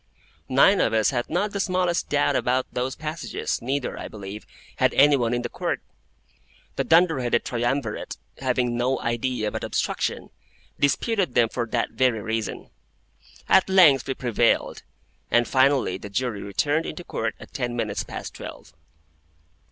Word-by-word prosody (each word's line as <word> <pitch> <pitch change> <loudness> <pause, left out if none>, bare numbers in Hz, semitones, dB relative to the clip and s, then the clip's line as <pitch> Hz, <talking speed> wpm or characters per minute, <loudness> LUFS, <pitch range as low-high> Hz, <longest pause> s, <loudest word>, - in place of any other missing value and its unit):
Nine - - +5
of - - +1
us 110 -1 +3
had 120 -2 -2
not 200 +5 0
the 200 - -4
smallest 180 -2 0
doubt 145 0 +2
about 130 +1 +1
those 125 +1 -2
passages, 155 +1 -4
neither, 135 +2 -2
I - - -5
believe, 100 0 -9 0.3
had - - +2
any 145 +1 +6
one 120 -4 0
in 120 0 -1
the - - -1
Court; - - -3 1.0
the - - 0
dunder 165 -3 +4
headed 120 -1 0
triumvirate, 120 -1 -2 0.2
having 125 -2 0
no 125 +2 0
idea 120 -2 -1
but - - -5
obstruction, - - -2 0.5
disputed 185 - +1
them 115 -2 +4
for 120 0 -3
that 115 +1 -1
very 125 -4 +1
reason. 110 0 -4 0.8
At 190 - +4
length 165 -9 +6
we 135 - -2
prevailed, 120 -1 +1 0.5
and 120 0 +3
finally 130 -8 +2
the 105 - -8
Jury 110 0 -2
returned 145 +11 0
into 175 - -6
Court 115 -8 -3
at - - -13
ten 120 -2 -2
minutes 105 -4 -2
past - - -7
twelve. 80 - -10
125 Hz, 155 wpm, -24 LUFS, 115-145 Hz, 1.0 s, any